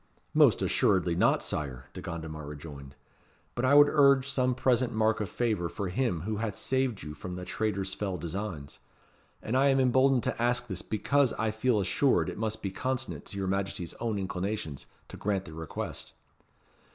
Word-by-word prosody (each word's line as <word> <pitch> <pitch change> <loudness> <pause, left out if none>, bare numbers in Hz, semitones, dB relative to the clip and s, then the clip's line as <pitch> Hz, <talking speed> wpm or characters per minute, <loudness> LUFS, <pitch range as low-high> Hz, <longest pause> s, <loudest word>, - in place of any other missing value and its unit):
"Most - - +5
assuredly 90 -3 +2
not, 85 - +3
Sire," 65 -4 -3
De - - -7
Gondomar 80 -2 -6
rejoined. 70 -2 -9 0.6
"But 120 - -1
I 140 +2 +5
would 145 0 +9
urge 140 -3 +5
some 130 -2 +1
present 125 -1 +2
mark 110 0 +2
of 100 - -3
favour 105 -8 -1
for 95 +3 -4
him 95 -4 0
who 105 +4 -3
hath 110 -1 -2
saved 130 -5 -1
you 75 - -6
from 90 +3 -7
the 90 0 -6
traitor's 100 -1 -2
fell 95 -3 -3
designs. 85 -4 -5 0.6
And 115 - -2
I 135 +2 +4
am 135 -1 +4
emboldened 130 0 +4
to 115 - -2
ask 120 0 +1
this, 95 -6 -4
because 135 +5 +1
I 110 -1 -1
feel 110 +1 +1
assured 95 - +2
it - - -7
must 110 0 -2
be 95 - -2
consonant 130 +5 -3
to 100 - -8
your 95 - -1
Majesty's 95 -3 -2
own 115 -3 -1
inclinations 95 -5 -3 0.2
to - - -10
grant 100 -2 -1
the 80 - -10
request." 80 -1 -6
105 Hz, 180 wpm, -29 LUFS, 90-125 Hz, 0.6 s, would